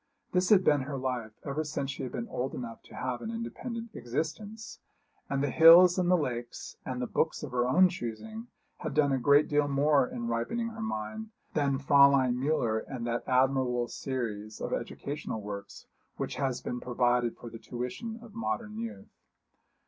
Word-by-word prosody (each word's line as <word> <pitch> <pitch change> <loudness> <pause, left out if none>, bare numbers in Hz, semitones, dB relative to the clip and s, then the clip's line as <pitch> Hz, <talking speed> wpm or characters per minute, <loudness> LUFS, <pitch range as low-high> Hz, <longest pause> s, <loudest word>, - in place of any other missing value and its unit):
This 180 0 +2
had 195 -3 +6
been 145 -4 +4
her 140 +1 -4
life 125 -4 -3
ever 150 +2 -1
since 150 -2 -3
she - - -7
had 130 - -4
been 120 -1 -4
old 130 +2 -3
enough 115 -2 -6
to - - -13
have 125 -1 -3
an 220 - -5
independent 230 0 -5
existence; 165 - -4 0.5
and 140 0 0
the 145 - 0
hills 170 +4 +8
and 180 -1 +1
the 180 - +5
lakes, 120 -6 -4
and 130 -1 -4
the 125 - -1
books 160 - -1
of - - -5
her 125 0 +1
own 185 +9 +6
choosing, 190 - -6 0.3
had - - -5
done 145 -2 +4
a 135 - +1
great 145 +3 +5
deal 145 0 +2
more 140 -1 +3
in 120 -1 -5
ripening 120 - -1
her 225 -1 -8
mind 220 - -4 0.2
than 140 -3 +1
Fräulein 140 -2 +5
Müller 125 -5 0
and 125 -4 -5
that 120 0 -2
admirable 130 -2 +2
series 110 -6 -4
of - - -3
educational 145 -5 -4
works 100 -1 -8 0.3
which - - -3
has 130 -3 -1
been 125 - -4
provided 120 -1 +1
for 120 - -9
the 115 - -9
tuition 125 - -5
of 225 -3 -13
modern 225 -1 -3
youth. 230 0 -7
135 Hz, 180 wpm, -30 LUFS, 120-175 Hz, 0.5 s, hills